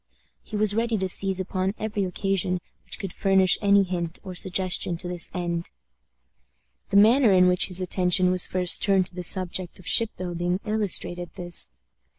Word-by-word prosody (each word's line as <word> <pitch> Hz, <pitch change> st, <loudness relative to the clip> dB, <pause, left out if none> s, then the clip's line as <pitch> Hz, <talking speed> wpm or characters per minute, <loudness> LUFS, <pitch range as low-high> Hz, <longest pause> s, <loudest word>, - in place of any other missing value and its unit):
He -, -, -10 dB
was 210 Hz, -1 st, +2 dB
ready 230 Hz, +1 st, -1 dB
to 190 Hz, -1 st, -2 dB
seize 190 Hz, +1 st, +1 dB
upon 190 Hz, +1 st, -3 dB
every 210 Hz, -2 st, -3 dB
occasion 185 Hz, -1 st, -2 dB, 0.3 s
which -, -, -5 dB
could 195 Hz, -3 st, -7 dB
furnish 190 Hz, -2 st, +2 dB
any 200 Hz, -1 st, +3 dB
hint 175 Hz, -2 st, -5 dB
or 190 Hz, -3 st, -8 dB
suggestion 180 Hz, -1 st, 0 dB
to 180 Hz, -, -7 dB
this 175 Hz, -2 st, 0 dB
end. 170 Hz, -1 st, -4 dB, 1.2 s
The 200 Hz, -, +1 dB
manner 225 Hz, +3 st, +4 dB
in 185 Hz, -1 st, +4 dB
which 180 Hz, 0 st, +2 dB
his 185 Hz, 0 st, 0 dB
attention 180 Hz, 0 st, +1 dB
was 185 Hz, -1 st, +3 dB
first 180 Hz, -1 st, +3 dB
turned 195 Hz, -2 st, +2 dB
to -, -, -27 dB
the 180 Hz, -, -6 dB
subject 185 Hz, 0 st, +1 dB
of 185 Hz, -, -14 dB
ship 220 Hz, +3 st, +3 dB
building 175 Hz, 0 st, -3 dB
illustrated 195 Hz, -5 st, -1 dB
this. 175 Hz, -1 st, +2 dB
185 Hz, 170 wpm, -24 LUFS, 180-200 Hz, 1.2 s, manner